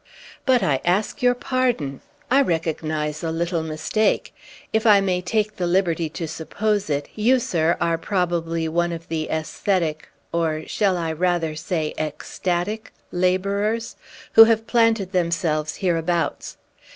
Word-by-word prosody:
"But 250 -5 +4
I 135 -6 +1
ask 195 +10 0
your 245 0 +4
pardon! 245 - -1 0.3
I 275 +2 +6
recognize 155 - -2
a 165 - -1
little 170 +1 -1
mistake. 160 +7 0 0.4
If 220 +1 +2
I 205 -2 +7
may 185 -2 0
take 215 +3 -1
the 180 - -1
liberty 175 -3 +1
to 165 +1 -5
suppose 200 +5 -2
it, 145 -1 -1
you, 235 +5 +3
sir, 170 -8 +1
are 165 -1 +1
probably 170 -3 -1
one 175 +2 0
of 165 0 -8
the 160 -1 -2
aesthetic 160 0 -1 0.2
or 160 -2 0
shall 195 -4 +1
I 165 -2 -2
rather 165 -1 0
say 155 -1 -2
ecstatic? 175 +6 -3 0.2
laborers, 200 +5 0 0.4
who 225 - +10
have 225 0 +2
planted 225 -5 +2
themselves 165 -4 0
hereabouts. 170 -2 -1
175 Hz, 140 wpm, -23 LUFS, 160-205 Hz, 0.4 s, who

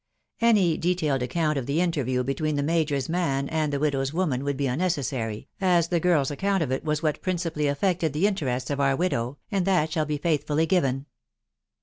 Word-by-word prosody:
Any 205 -8 +4
detailed 165 -6 0
account 150 +3 0
of 125 - -6
the 145 +4 0
interview 140 -8 0
between 145 +4 -1
the 145 - 0
major's 150 -4 0
man 150 -5 0
and 155 -2 0
the 140 - -1
widow's 135 -2 0
woman 155 -6 -1
would 140 -1 -2
be 140 - 0
unnecessary, 130 -7 -2
as 175 -3 +3
the 175 - +2
girl's 155 -5 +2
account 195 +4 0
of 135 - -3
it 130 - -1
was 155 0 -1
what 155 -2 0
principally 165 -5 -1
affected 165 +2 0
the 155 +7 +1
in 210 - +3
terests 130 -7 -2
of 145 - -2
our 135 -1 +3
widow, 140 -6 -1
and 195 -3 +1
that 175 -5 +2
shall 155 -2 0
be 150 -1 -1
faithfully 155 0 +1
given. 140 -7 +1
150 Hz, 200 wpm, -25 LUFS, 135-175 Hz, -, Any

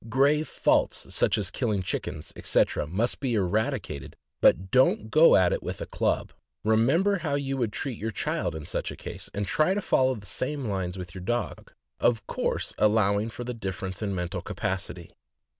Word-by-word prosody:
Grave 145 +5 +3
faults, - - +1
such - - +3
as 100 -4 -2
killing 105 -7 -1
chickens, 75 -3 -4
etc., 75 - +1
must 105 +10 -1
be 130 -4 0
eradicated, 95 -8 -1 0.3
but 95 +2 +4
don't 125 -4 +3
go 160 +2 +7
at 90 -2 +4
it - - -2
with - - -5
a - - -4
club. - - -1 0.3
Remember 140 - +3
how 150 -4 -1
you 135 -1 -1
would 120 -4 0
treat 125 +2 -4
your 110 - -2
child 95 - -2
in 80 -2 -6
such - - -3
a - - -6
case, - - -8
and 100 0 -2
try 155 - +2
to - - +1
follow 130 -9 +2
the 100 -3 -10
same 135 +8 -3
lines 95 -3 -2
with 90 -2 -7
your 95 - -8
dog, 120 +5 -3 0.3
of 115 -3 +2
course - - -1
allowing 105 0 +3
for 120 - -7
the 125 0 -4
difference 95 -3 -5
in 100 -2 -1
mental 90 +1 -3
capacity. 90 -1 -4
110 Hz, 185 wpm, -27 LUFS, 95-130 Hz, 0.3 s, go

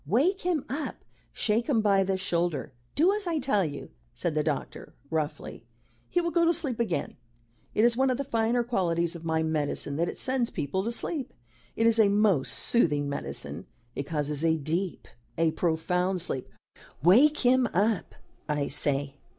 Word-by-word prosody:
"Wake 300 - +2
him 345 -5 -1
up. 290 +3 -5 0.3
Shake 225 +2 0
him 250 -6 +3
by 200 -2 +3
the 190 0 0
shoulder. 175 -6 -2 0.2
Do 350 +7 +4
as 415 -3 -3
I 335 -2 0
tell 255 -8 +2
you," 145 - -6 0.2
said 170 - -2
the 155 - +1
doctor, 150 -3 -4 0.2
roughly. 155 -6 -3 0.5
"He 355 - +1
will 340 0 -1
go 340 0 +3
to 335 0 +4
sleep 260 -8 -1
again. 220 -8 -2 0.6
It 215 - +4
is 240 -1 +4
one 265 +2 +2
of 255 - 0
the 280 - -2
finer 235 -1 +1
qualities 170 -7 0
of 170 - -9
my 160 0 +1
medicine 150 -2 -1
that 170 +2 0
it - - -7
sends 260 -2 +1
people 150 +7 -2
to 230 - -1
sleep. 270 +3 -3 0.4
It 225 - +1
is 230 0 +4
a 215 - +6
most 200 -8 +2
soothing 150 -11 +2
medicine. 70 - -5 0.3
It 140 - -4
causes 150 -1 -1
a 160 -1 +3
deep 165 +3 -3 0.3
a 165 -1 +3
profound 180 +3 0
sleep. 135 -6 -3 0.5
Wake 260 - +5
him 250 -1 +4
up, 205 +2 0 0.3
I 145 -1 0
say." 140 0 0
190 Hz, 175 wpm, -28 LUFS, 160-245 Hz, 0.6 s, a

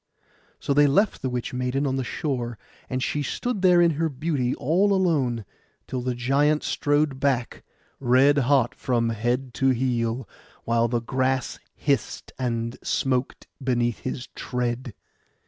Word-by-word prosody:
So 140 - 0
they 145 +1 +5
left 200 +10 +2
the 130 - -1
witch 125 -1 -3
maiden 125 +3 -1
on 135 -1 0
the 135 - -1
shore; 120 -4 -3 0.3
and 130 0 -1
she 150 - -1
stood 235 - -2
there 180 -2 +6
in 170 -1 +5
her 160 +2 0
beauty 135 -3 -1
all 190 +8 +2
alone, 140 - +1 0.4
till 130 - -4
the 125 0 -2
giant 140 +5 +2
strode 145 -2 +1
back 135 -4 0 0.4
red 135 +3 +4
hot 130 -2 +3
from 120 -2 0
head 120 +3 -1
to 135 - +2
heel, 120 -2 0 0.4
while 115 0 +2
the 120 0 -1
grass 130 +2 -1 0.2
hissed 140 -6 -1
and 115 -2 -2
smoked 130 -1 -1 0.2
beneath 120 -3 0
his 130 -1 -5
tread. 125 -2 -3
130 Hz, 145 wpm, -25 LUFS, 120-145 Hz, 0.4 s, there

